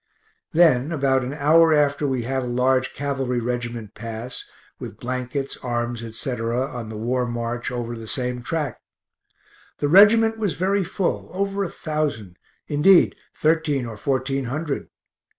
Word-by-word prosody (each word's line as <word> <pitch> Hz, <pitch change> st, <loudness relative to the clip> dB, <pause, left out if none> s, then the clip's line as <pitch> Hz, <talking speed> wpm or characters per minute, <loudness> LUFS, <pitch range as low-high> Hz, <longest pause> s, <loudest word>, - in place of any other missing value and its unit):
Then 155 Hz, -4 st, +4 dB
about 135 Hz, -4 st, +2 dB
an 125 Hz, -, -4 dB
hour 160 Hz, +2 st, +5 dB
after 145 Hz, 0 st, +2 dB
we 130 Hz, -3 st, -1 dB
had 130 Hz, +2 st, -1 dB
a 125 Hz, -, -4 dB
large 130 Hz, +1 st, +1 dB
cavalry 135 Hz, -3 st, -1 dB
regiment 120 Hz, -2 st, -4 dB
pass, 115 Hz, +2 st, -6 dB, 0.4 s
with -, -, -8 dB
blankets, 130 Hz, +2 st, -3 dB
arms, 120 Hz, -1 st, -3 dB
etc., 115 Hz, 0 st, -3 dB
on 120 Hz, -5 st, -6 dB
the 110 Hz, -, -6 dB
war 125 Hz, +3 st, -1 dB
march 120 Hz, 0 st, -3 dB
over 120 Hz, -1 st, -4 dB
the 115 Hz, -1 st, -9 dB
same 125 Hz, 0 st, -2 dB
track. 150 Hz, 0 st, -3 dB, 1.0 s
The -, -, -1 dB
regt. 220 Hz, +6 st, +6 dB
was 200 Hz, -9 st, -1 dB
very 190 Hz, +4 st, +1 dB
full, 185 Hz, +1 st, -2 dB
over 200 Hz, +1 st, -1 dB
a 185 Hz, -, -3 dB
thousand 145 Hz, -, -3 dB, 0.3 s
indeed 170 Hz, +6 st, +5 dB, 0.2 s
thirteen 155 Hz, -4 st, +1 dB
or 115 Hz, -2 st, -6 dB
fourteen 135 Hz, +3 st, -1 dB
hundred. 145 Hz, +4 st, -3 dB
130 Hz, 145 wpm, -23 LUFS, 120-155 Hz, 1.0 s, regt